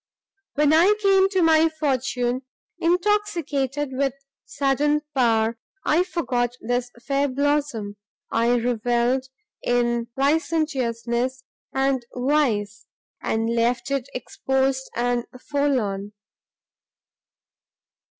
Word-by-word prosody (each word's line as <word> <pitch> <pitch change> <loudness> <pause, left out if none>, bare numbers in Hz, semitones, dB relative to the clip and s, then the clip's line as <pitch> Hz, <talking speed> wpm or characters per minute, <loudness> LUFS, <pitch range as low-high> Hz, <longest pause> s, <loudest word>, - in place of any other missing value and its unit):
"When 300 +1 +4
I 360 +6 +6
came 390 -2 +4
to 380 -3 +2
my 320 0 +5
fortune, 260 -5 -1 0.4
intoxicated 335 -7 0
with 270 0 0 0.3
sudden 290 +2 +1
power, 230 -3 +2 0.3
I 320 +3 +4
forgot 245 -9 -1
this 245 +1 -1 0.2
fair 280 +1 +1
blossom, 280 -6 -1 0.3
I 235 +2 +3
revelled 240 +2 0 0.3
in 240 -1 +1
licentiousness 260 -5 0 0.3
and 270 -1 +1
vice, 245 -7 0 0.3
and 225 0 0
left 240 +2 0
it 275 -2 -1
exposed 265 +1 -1
and 240 0 0
forlorn. 240 -9 -1
265 Hz, 90 wpm, -23 LUFS, 240-295 Hz, 0.4 s, I